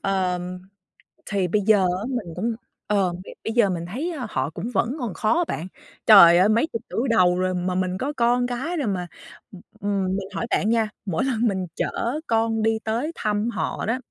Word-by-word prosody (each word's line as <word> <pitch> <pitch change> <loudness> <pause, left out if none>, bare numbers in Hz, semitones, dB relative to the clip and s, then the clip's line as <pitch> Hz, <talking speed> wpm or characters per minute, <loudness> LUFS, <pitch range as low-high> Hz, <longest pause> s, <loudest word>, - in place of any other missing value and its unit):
Ờm, 180 -2 -1 0.7
thì 195 -3 0
bây 210 +4 +1
giờ 210 0 +4 0.2
á, - - -5
mình 210 -10 -4
cũng, 225 +5 -1 0.3
ờ, 195 -4 +1
b 180 +2 -9 0.2
bây 225 - -3
giờ 230 -5 +4
mình 170 -2 -3
thấy, 275 - -3
a, 245 - -4
họ 130 +2 -1
cũng 225 +9 -5
vẫn 235 +8 0
còn 235 -6 -3
khó 215 - +1
á 350 - +3
bạn. 170 +4 -4 0.4
Trời 175 -5 +9
ơi, 190 +4 +5
mấy 230 +8 +3
chục 230 - -2
tuổi 250 +4 -1
đầu 180 -5 +4
rồi 185 0 0
mà 180 0 -2
mình 185 0 -1
có 280 +6 -3
con 245 +1 +2
cái 265 +9 -3
rồi, 280 -8 -1
mà, 180 -3 -2 0.4
ừm, 190 - -12 0.2
ừm, 200 -1 -1
mình 195 - -5
hỏi 235 - -2
bạn 210 - +1
nha, 225 -2 +2 0.2
mỗi 195 +6 -1
lần 240 -3 +1
mình 190 -3 -1
chở 245 +10 -2
con 225 -1 +1
đi 220 0 +2
tới 235 +9 -1
thăm 210 +1 -1
họ - - -3
đó, 230 +3 0
210 Hz, 215 wpm, -23 LUFS, 185-235 Hz, 0.7 s, Trời